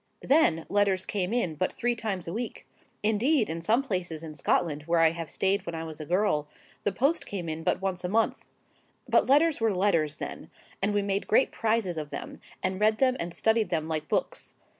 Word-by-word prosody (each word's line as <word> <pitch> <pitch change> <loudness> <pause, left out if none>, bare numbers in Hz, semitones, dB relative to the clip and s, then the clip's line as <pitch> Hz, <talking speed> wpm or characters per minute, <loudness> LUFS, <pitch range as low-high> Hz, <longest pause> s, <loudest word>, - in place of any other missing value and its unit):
Then 215 - +3
letters 200 -2 +2
came 190 -2 -2
in 230 -9 0
but 185 +5 -1
three 240 0 0
times 200 -7 -3
a 165 - -4
week: 230 +1 -5 0.4
indeed, 220 - +2
in 165 +1 -4
some 225 +9 +2
places 180 - -3
in 155 -1 -7
Scotland 150 0 0
where 170 0 +3
I 165 -1 +5
have 165 -1 -6
stayed 195 0 +1
when 170 -3 -5
I 160 - -4
was 160 -1 -6
a 150 - -7
girl, 175 -5 +1 0.4
the 205 - +1
post 275 - +1
came 185 -4 -4
in 160 0 -3
but 175 - 0
once 185 -2 -1
a 180 - -2
month;—but 225 +3 -2
letters 295 +1 +4
were 225 -1 +3
letters 165 -6 +2
then; - - -7 0.3
and 200 +2 +1
we 205 - +2
made 200 0 -1
great 260 - +3
prizes 220 -7 0
of 150 -1 -6
them, - - -7 0.2
and 185 +1 -1
read 215 0 +4
them 255 0 +3
and 170 - -3
studied 220 +4 +1
them 160 -2 -1
like 155 -1 -3
books. - - -2
190 Hz, 205 wpm, -28 LUFS, 165-220 Hz, 0.4 s, I